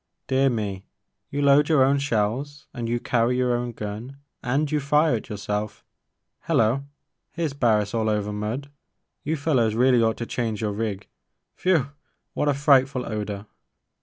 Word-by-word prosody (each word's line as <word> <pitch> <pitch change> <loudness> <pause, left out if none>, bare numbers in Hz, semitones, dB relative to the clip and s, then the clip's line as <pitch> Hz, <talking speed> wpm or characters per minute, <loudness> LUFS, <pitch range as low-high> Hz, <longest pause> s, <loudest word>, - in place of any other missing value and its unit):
Dear 135 +1 +3
me! 100 -5 -3 0.4
You 145 +1 -2
load 140 +2 +5
your 150 -5 +5
own 140 +1 +3
shells 140 +4 -1
and 120 -2 -4
you 120 +1 0
carry 120 0 +1
your 125 -1 +2
own 120 0 -2
gun 110 +5 -7 0.2
and 140 +4 0
you 150 - +2
fire 150 -1 +3
it - - -10
yourself 105 0 -4 0.3
— - - -35
^liello! 120 +5 +2 0.5
here 170 -1 -1
's 140 - -6
Barris 110 -7 +1
all 110 -1 +1
over 105 -1 -1
mud. 115 +7 -4 0.5
You 155 +2 -1
fellows 130 -8 +1
really 125 0 +4
ought 110 -1 +1
to 120 - -4
change 115 -3 -2
your 105 -2 -1
rig 105 -2 -3 0.3
— - - -53
whew! 160 -7 +2 0.4
what 150 - 0
a 140 - +2
frightful 135 -2 +3
odor 105 -2 -4
120 Hz, 170 wpm, -24 LUFS, 110-140 Hz, 0.5 s, load